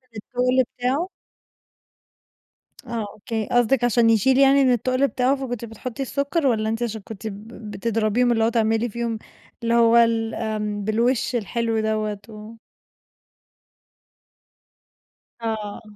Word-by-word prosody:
التُّقل 250 Hz, +3 st, +1 dB
بتاعه. 265 Hz, +9 st, -1 dB, 1.8 s
آه 230 Hz, -3 st, -3 dB
أوكي، 220 Hz, +1 st, -4 dB
قصدِك 245 Hz, +1 st, +3 dB
عشان 235 Hz, -1 st, +4 dB
يشيل 225 Hz, +4 st, +4 dB
يعني 275 Hz, 0 st, +6 dB
إن 260 Hz, -2 st, +4 dB
التُّقل 255 Hz, +3 st, +2 dB
بتاعه 260 Hz, +1 st, +1 dB
فكنتِ 245 Hz, -4 st, -5 dB
بتحطّي 230 Hz, +3 st, -7 dB
السُّكّر 280 Hz, +3 st, 0 dB
والّا 220 Hz, -3 st, +1 dB
أنتِ 225 Hz, +2 st, -2 dB
عشان 220 Hz, -2 st, -3 dB
كنتِ 220 Hz, +2 st, -8 dB
ب 210 Hz, +1 st, -8 dB, 0.2 s
بتضربيهم، 225 Hz, +3 st, +1 dB
اللي 225 Hz, -1 st, +2 dB
هو 225 Hz, -, +3 dB
تعملي 225 Hz, 0 st, +1 dB
فيهم 230 Hz, 0 st, -3 dB, 0.4 s
اللي 230 Hz, -, +1 dB
هو 235 Hz, 0 st, +5 dB
ال 230 Hz, -1 st, +3 dB
آمم، 210 Hz, -1 st, -3 dB
بالوِش 245 Hz, +4 st, +1 dB
الحلو 230 Hz, +1 st, -1 dB
دَوّة؟ 215 Hz, -1 st, -1 dB
و 215 Hz, 0 st, -10 dB, 2.9 s
آه. 220 Hz, -2 st, -4 dB
230 Hz, 125 wpm, -23 LUFS, 220-250 Hz, 2.9 s, يعني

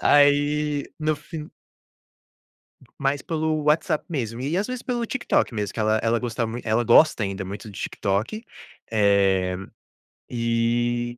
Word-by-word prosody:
Aí 145 Hz, 0 st, +3 dB
no 155 Hz, 0 st, +1 dB
fin 150 Hz, +1 st, -8 dB, 1.5 s
Mais 140 Hz, 0 st, 0 dB
pelo 155 Hz, -1 st, -1 dB
WhatsApp 150 Hz, 0 st, +2 dB
mesmo, 120 Hz, -8 st, -3 dB
e 145 Hz, +7 st, -1 dB
às 200 Hz, -, 0 dB
vezes 255 Hz, -1 st, -4 dB
pelo 240 Hz, -2 st, -2 dB
TikTok 260 Hz, -, 0 dB
mesmo, 105 Hz, -3 st, -3 dB
que -, -, -3 dB
ela 110 Hz, 0 st, +2 dB
ela 115 Hz, +1 st, +2 dB
gostava 115 Hz, -1 st, -2 dB
muito 120 Hz, +2 st, -6 dB
ela 110 Hz, +2 st, +2 dB
gosta 120 Hz, 0 st, +5 dB
ainda 95 Hz, 0 st, -4 dB
muito 100 Hz, +3 st, -7 dB
do -, -, -10 dB
TikTok, 105 Hz, -, -2 dB, 0.5 s
eh, 95 Hz, -3 st, +3 dB, 0.7 s
e 120 Hz, +1 st, 0 dB
120 Hz, 140 wpm, -24 LUFS, 110-150 Hz, 1.5 s, gosta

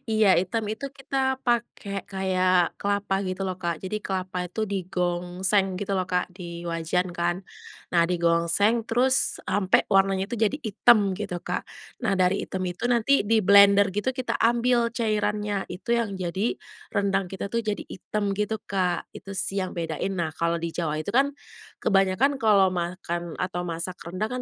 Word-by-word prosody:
Iya, 215 Hz, -3 st, +4 dB
hitam 190 Hz, +5 st, -1 dB
itu 220 Hz, +6 st, -4 dB
kita 265 Hz, -1 st, -1 dB
pakai 230 Hz, -5 st, -2 dB
kayak 185 Hz, -2 st, +1 dB
kelapa 200 Hz, -1 st, 0 dB
gitu 185 Hz, +1 st, -3 dB
loh, 185 Hz, -, -3 dB
Kak, 170 Hz, -3 st, -3 dB
jadi 205 Hz, +3 st, -3 dB
kelapa 185 Hz, -1 st, -3 dB
itu 215 Hz, +5 st, -4 dB
digongseng 185 Hz, +1 st, 0 dB
gitu 195 Hz, -1 st, -1 dB
loh, 185 Hz, -, 0 dB
Kak, 180 Hz, -1 st, 0 dB
di 170 Hz, -2 st, -8 dB
wajan 170 Hz, +2 st, -1 dB
kan. 175 Hz, +1 st, -1 dB, 0.5 s
Nah, 170 Hz, -1 st, +4 dB
digongseng 170 Hz, +6 st, +2 dB
terus 255 Hz, +3 st, +2 dB
sampai 190 Hz, -2 st, +2 dB
warnanya 195 Hz, 0 st, +3 dB
itu 240 Hz, -, -2 dB
jadi 220 Hz, +1 st, +2 dB
hitam 215 Hz, -1 st, +4 dB
gitu, 195 Hz, -4 st, -4 dB
Kak. -, -, -3 dB, 0.4 s
Nah, 205 Hz, -, +2 dB
dari 185 Hz, +1 st, +2 dB
hitam 190 Hz, -, -5 dB
itu 180 Hz, +6 st, -6 dB
nanti 245 Hz, +1 st, +3 dB
diblender 200 Hz, -2 st, +6 dB
gitu 210 Hz, +7 st, -1 dB
kita 255 Hz, 0 st, -2 dB
ambil 235 Hz, 0 st, +2 dB
cairannya 210 Hz, -3 st, 0 dB
itu 185 Hz, +6 st, -7 dB
yang 230 Hz, -4 st, -1 dB
jadi, 190 Hz, -, -1 dB, 0.4 s
rendang 195 Hz, -1 st, +1 dB
kita 190 Hz, +2 st, -5 dB
tuh 230 Hz, -, 0 dB
jadi 210 Hz, -2 st, -2 dB
hitam 205 Hz, +2 st, -3 dB
gitu, 210 Hz, +1 st, -1 dB
Kak, 180 Hz, -3 st, -1 dB
itu 195 Hz, -, -9 dB
sih 195 Hz, +1 st, -1 dB
yang 185 Hz, -, -6 dB
bedain. 165 Hz, +3 st, -3 dB
Nah, 170 Hz, -3 st, -1 dB
kalau 170 Hz, +1 st, +1 dB
di 170 Hz, -, -2 dB
Jawa 155 Hz, -2 st, -2 dB
itu -, -, -14 dB
kan, 275 Hz, +5 st, +3 dB, 0.5 s
kebanyakan 195 Hz, +8 st, +3 dB
kalau 205 Hz, -4 st, +5 dB
makan 175 Hz, -1 st, -3 dB
atau 180 Hz, -1 st, -2 dB
masak 170 Hz, +2 st, -4 dB
rendang 185 Hz, +5 st, -2 dB
195 Hz, 160 wpm, -25 LUFS, 180-215 Hz, 0.5 s, diblender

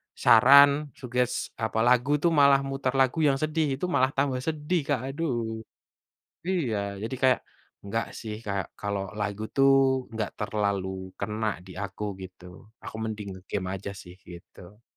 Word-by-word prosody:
saran, 140 Hz, +4 st, +6 dB
suggest, 125 Hz, -1 st, -2 dB
apa, 110 Hz, 0 st, 0 dB
lagu 125 Hz, +4 st, +3 dB
itu, 165 Hz, +3 st, +1 dB
malah 140 Hz, -2 st, +5 dB
mutar 135 Hz, -1 st, -2 dB
lagu 135 Hz, +4 st, +2 dB
yang 145 Hz, -3 st, +4 dB
sedih, 155 Hz, -1 st, 0 dB
itu 135 Hz, -, -12 dB
malah 130 Hz, -2 st, +2 dB
tambah 135 Hz, -2 st, 0 dB
sedih 155 Hz, +4 st, -1 dB
Kak, 120 Hz, -, -6 dB
aduh. 120 Hz, -8 st, -2 dB, 0.9 s
Iya, 110 Hz, -, -1 dB
jadi 125 Hz, +4 st, -3 dB
kayak, 130 Hz, -, +5 dB, 0.4 s
"Nggak 115 Hz, +3 st, -2 dB
sih, 110 Hz, -2 st, -6 dB
kayak 100 Hz, -1 st, -3 dB
kalau 100 Hz, -2 st, -3 dB
lagu 105 Hz, +1 st, -3 dB
itu 135 Hz, -, +1 dB, 0.5 s
nggak 110 Hz, -2 st, -3 dB
terlalu 100 Hz, -3 st, -2 dB
kena 105 Hz, +1 st, -2 dB
di 95 Hz, -, -11 dB
aku." 100 Hz, +1 st, -4 dB
gitu. 90 Hz, +2 st, -12 dB
Aku -, -, -8 dB
mending 105 Hz, -2 st, -5 dB
nge-game 95 Hz, 0 st, -5 dB
aja 100 Hz, +1 st, -6 dB
sih 90 Hz, -1 st, -11 dB
gitu. 90 Hz, +4 st, -14 dB
115 Hz, 150 wpm, -27 LUFS, 100-135 Hz, 0.9 s, saran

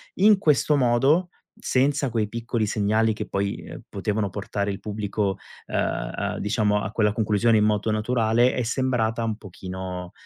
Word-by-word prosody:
in 205 Hz, +1 st, +5 dB
questo 150 Hz, -3 st, +3 dB
modo, 135 Hz, +8 st, +3 dB, 0.3 s
senza 140 Hz, +1 st, +1 dB
quei 110 Hz, -2 st, 0 dB
piccoli 115 Hz, 0 st, -2 dB
segnali 110 Hz, +2 st, +1 dB
che 105 Hz, 0 st, -5 dB
poi, 100 Hz, 0 st, -2 dB
uhm, -, -, -9 dB
potevano 105 Hz, 0 st, -1 dB
portare 100 Hz, +1 st, -3 dB
il 95 Hz, -, -5 dB
pubblico, 105 Hz, -2 st, -2 dB, 0.3 s
uhm, -, -, -2 dB
diciamo 105 Hz, -1 st, +1 dB
a 95 Hz, -, -4 dB
quella 105 Hz, -2 st, +2 dB
conclusione 110 Hz, +1 st, +2 dB
in 105 Hz, -, +3 dB
modo 105 Hz, +1 st, +1 dB
naturale, 115 Hz, +2 st, +2 dB
è 125 Hz, -, -1 dB
sembrata 120 Hz, -2 st, 0 dB
un 110 Hz, -1 st, -1 dB
pochino 90 Hz, -2 st, -7 dB
110 Hz, 150 wpm, -24 LUFS, 105-120 Hz, 0.3 s, in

